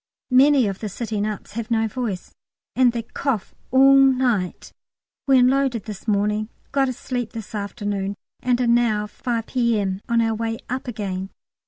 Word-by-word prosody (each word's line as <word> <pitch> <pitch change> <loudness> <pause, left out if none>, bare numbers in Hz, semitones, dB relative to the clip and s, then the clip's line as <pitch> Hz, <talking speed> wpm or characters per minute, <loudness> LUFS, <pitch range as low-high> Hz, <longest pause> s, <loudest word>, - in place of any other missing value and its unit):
Many 270 0 +6
of 195 -2 -3
the 215 - -4
sitting 215 0 -2
ups 210 -2 -6
have 230 +2 -5
no 225 -1 +2
voice, 220 -5 -4 0.4
and 255 -2 +5
they 235 -1 -3
cough 245 -2 -3 0.2
all 270 +1 +6
night. 255 -8 +2 0.5
We 270 -1 +6
unloaded 255 -3 +3
this 210 0 -9
morning, 210 +1 +1 0.2
got 270 -1 +2
a - - -2
sleep 245 -2 -4
this 225 -2 -8
afternoon, 205 -1 -3 0.2
and 250 -1 +1
are 250 - +2
now, 235 -3 +2
5 230 +2 -3
P.M., 215 -7 0
on 235 0 +3
our 225 -1 +2
way 225 +1 -2
up 255 +1 -3
again. 195 -5 -4
230 Hz, 165 wpm, -22 LUFS, 210-250 Hz, 0.5 s, Many